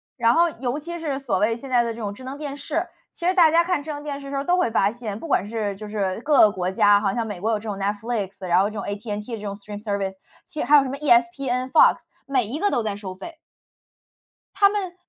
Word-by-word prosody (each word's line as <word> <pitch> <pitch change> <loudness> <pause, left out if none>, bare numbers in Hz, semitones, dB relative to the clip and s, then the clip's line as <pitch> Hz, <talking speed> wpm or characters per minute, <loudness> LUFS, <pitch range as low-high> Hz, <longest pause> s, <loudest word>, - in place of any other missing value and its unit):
然 230 0 +3
后 340 +1 +5
尤 250 +1 -2
其 345 +3 -6
是 290 -4 -2
所 230 -9 -1
谓 225 +3 +1
现 270 +3 -10
在 245 -1 +5
的 235 - -2
这 230 - -8
种 205 -2 -4
智 255 +6 -12
能 265 +2 -6
电 285 -2 -5
视， 285 - -2 0.3
其 340 - -7
实 365 - +3
大 345 -4 +6
家 335 +2 +4
看 350 -4 0
智 310 - -6
能 290 0 -6
电 285 -1 -5
视 275 - -9
的 275 - -7
时 275 - -2
候 275 - -1
都 355 +4 +2
会 360 - +2
发 205 -3 +2
现， 220 -3 -6
不 330 - -7
管 205 - +1
是 210 -2 -3
就 210 +2 -9
是 200 -1 -2
各 290 -1 +3
个 210 - +7
国 185 -2 -2
家， 205 +2 +4
好 195 -2 0
像 230 -2 -1
美 205 -5 -6
国 220 - 0
有 220 - +1
这 210 - -11
种 205 - -3
Netflix， 205 -1 -3
然 175 +1 +4
后 200 +2 +2
这 215 - -11
种 - - -4
AT&T 210 +2 -5
这 - - -11
种 200 -1 -4
stream 205 0 -9
service， 200 -3 -2 0.3
其 310 - -8
实 - - 0
还 295 - +8
有 280 - +5
什 265 - -4
么 275 - -4
ESPN、 255 -1 +1
FOX 310 - +6 0.3
每 260 -4 +1
一 255 +9 -5
个 410 +3 +2
都 240 - 0
在 210 -2 -2
收 195 -2 -7
费。 325 - -10 1.2
他 400 0 +5
们 390 -4 -3
235 Hz, 395 characters per minute, -23 LUFS, 205-285 Hz, 1.2 s, 还